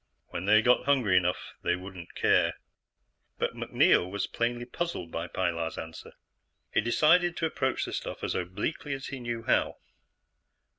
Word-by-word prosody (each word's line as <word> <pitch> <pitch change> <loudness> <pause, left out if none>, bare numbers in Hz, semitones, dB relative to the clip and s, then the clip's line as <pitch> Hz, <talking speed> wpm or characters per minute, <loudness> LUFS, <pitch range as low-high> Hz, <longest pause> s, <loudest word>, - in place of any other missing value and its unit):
When 90 - -4
they 110 +2 +5
got 125 +1 +4
hungry 130 -9 +3
enough, 90 -1 +1
they - - +1
wouldn't 90 -2 -10
care. - - +3 0.8
But - - -1
MacNeil 90 - +3
was 100 +1 -2
plainly 120 +1 -2
puzzled 125 - -4
by 85 +1 -3
Pilar's 85 -3 -2
answer. 80 0 -8 0.6
He - - +3
decided 170 - +3
to 165 - 0
approach 130 -4 -1
the - - -6
stuff - - -5
as - - -1
obliquely 105 - -3
as 135 - -7
he 135 - -5
knew 120 -1 -4
how. 125 - +1
115 Hz, 155 wpm, -29 LUFS, 90-135 Hz, 0.8 s, they